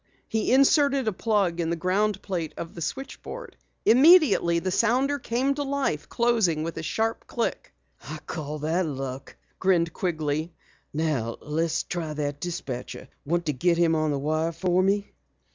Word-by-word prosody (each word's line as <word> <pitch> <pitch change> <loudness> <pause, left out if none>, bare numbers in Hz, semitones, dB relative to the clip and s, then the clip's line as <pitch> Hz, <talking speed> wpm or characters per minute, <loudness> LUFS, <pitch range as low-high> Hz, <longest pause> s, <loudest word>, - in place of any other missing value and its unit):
He 220 0 0
inserted 275 -1 +4
a 215 - +1
plug 195 -5 0
in 165 -1 0
the 170 - -1
groundplate 185 -2 -1
of 165 - -6
the 170 - -8
switchboard. 275 - -6 0.3
Immediately 270 - +6
the 185 +2 -1
sounder 260 +8 +2
came 260 +4 0
to 290 - -4
life, 280 -1 -1
closing 225 -10 +2
with 165 +1 -4
a - - -3
sharp 220 +8 -2
click. 235 - -3 0.4
"I 155 - -5
call 155 -2 -5
that 160 +4 0
luck!" 135 -2 -6 0.2
grinned 170 -3 +2
Quigley. 155 -2 -2 0.4
"Now 145 -7 -1
let's 160 +2 -1
try 165 -3 -4
that 145 -1 -3
dispatcher. 135 -7 -5 0.2
Want 170 +3 0
to 150 - 0
get 170 +6 +2
him 170 -1 +3
on 155 -1 +1
the 145 - 0
wire 155 +3 0
for 180 +2 +1
me?" 200 +2 +1
175 Hz, 160 wpm, -26 LUFS, 155-225 Hz, 0.4 s, Immediately